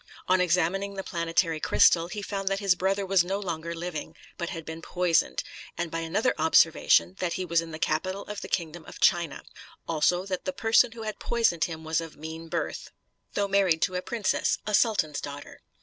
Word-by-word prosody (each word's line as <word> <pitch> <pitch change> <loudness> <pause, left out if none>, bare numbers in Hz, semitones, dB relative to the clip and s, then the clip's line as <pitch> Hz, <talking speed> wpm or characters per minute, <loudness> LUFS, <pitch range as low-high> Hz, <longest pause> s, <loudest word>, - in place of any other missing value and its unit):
On 185 0 +4
examining 180 +3 +1
the 195 - -4
planetary 165 -2 0
crystal, 165 +2 +4
he 205 +3 -6
found 195 -1 -4
that 195 0 +1
his 200 -3 +3
brother 195 +2 0
was 190 -2 +4
no 195 +3 -2
longer 170 -3 -4
living, 165 -2 -5 0.2
but 170 -1 -4
had 165 -4 -6
been 160 +1 -7
poisoned; 175 -1 +1 0.3
and 170 -1 -3
by 165 - -2
another 180 +9 0
observation, 160 +3 +4
that 175 -2 -1
he 185 - -3
was 170 -1 +2
in 165 - -8
the 155 - -6
capital 185 +6 -1
of 210 -1 -7
the - - -6
kingdom 170 -1 -3
of - - -11
China; 170 -5 +2 0.4
also 170 +3 +1
that 190 -2 -4
the 280 - -2
person 225 -1 +3
who 230 -1 -8
had 215 -2 -5
poisoned 225 -9 +1
him 160 -2 -7
was 160 +1 0
of 165 -1 -9
mean 160 +2 -7
birth, - - -3 0.5
though 200 -1 +1
married 195 -5 +2
to 185 - +1
a 180 - -1
princess, 225 +2 0
a 210 - -3
sultan's 200 -9 +2
daughter. 145 0 -8
175 Hz, 200 wpm, -27 LUFS, 165-195 Hz, 0.5 s, On